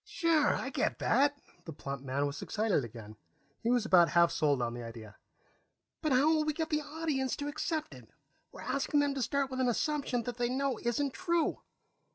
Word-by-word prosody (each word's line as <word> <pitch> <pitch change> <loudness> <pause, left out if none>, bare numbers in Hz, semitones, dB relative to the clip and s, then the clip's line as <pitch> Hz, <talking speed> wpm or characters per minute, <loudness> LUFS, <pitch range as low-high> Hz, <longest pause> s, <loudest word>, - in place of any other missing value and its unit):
"Sure. 325 -4 +2
I - - -4
get - - 0
that." 285 +1 +2 0.3
The 165 - -7
plump 140 -1 -6
man 140 +1 -1
was 140 0 -4
excited 210 -9 0
again; 110 -2 -10 0.4
he 230 - 0
was 245 -2 +2
about 175 -5 +6
half 170 -1 +4
sold 145 -3 +2
on 120 -1 -1
the 120 - -6
idea. 115 -3 -9 0.9
"But 310 - 0
how 265 +3 +4
will 310 -1 +2
we 305 0 0
get 320 +1 -3
the 300 0 +1
audience 295 -4 -2
to 285 - -4
accept 310 +1 -3
it? - - -14 0.4
We're - - -11
asking 280 +1 0
them 285 -1 +1
to 275 - -3
start 275 +2 0
with 260 - -3
an 255 -1 +2
assumption 265 -1 0
they 240 0 -2
know 265 -2 -1
isn't 260 +3 -1
true." 340 -3 0
255 Hz, 200 wpm, -31 LUFS, -, 0.9 s, about